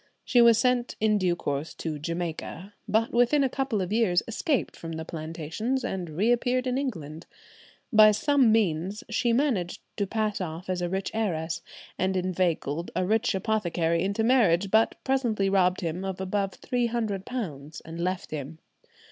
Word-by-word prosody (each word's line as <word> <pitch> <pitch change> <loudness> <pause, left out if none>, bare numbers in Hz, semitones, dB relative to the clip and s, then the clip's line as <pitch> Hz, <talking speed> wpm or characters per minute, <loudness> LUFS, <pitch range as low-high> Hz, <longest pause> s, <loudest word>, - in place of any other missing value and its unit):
She 245 - +4
was 235 -1 +7
sent 250 -1 +1
in 215 -1 +3
due 180 -2 +1
course 145 -1 -3
to 155 -2 -4
Jamaica, 170 +3 -5
but 220 +2 +1
within 245 +5 +4
a 265 - +2
couple 255 -7 -1
of 185 +3 -4
years 215 -6 +3
escaped 255 +4 -1
from 165 0 -7
the 160 0 -5
plantations, 165 - -3
and 185 -3 -3
reappeared 240 +9 +1
in 255 -1 0
England. 165 - -5 0.7
By 215 0 +9
some 260 +3 +3
means 195 -1 0
she 240 +1 +1
managed 230 - 0 0.2
to 200 - 0
pass 215 -1 -1
off 175 +1 -4
as 180 -1 -2
a 175 - -1
rich 190 +1 -2
heiress, 165 -7 -2 0.4
and 190 0 +1
inveigled 175 -3 -1
a 185 - +1
rich 220 +2 +1
apothecary 175 -5 0
into 200 +4 0
marriage, 200 -7 +3
but 220 +1 +4
presently 235 -7 +1
robbed 185 -1 +3
him 170 +1 -3
of 190 -1 -4
above 195 0 -2
£300 220 - -3
and 165 +1 -6
left 185 +1 -2
him. 155 +1 -5
195 Hz, 160 wpm, -27 LUFS, 170-230 Hz, 0.7 s, By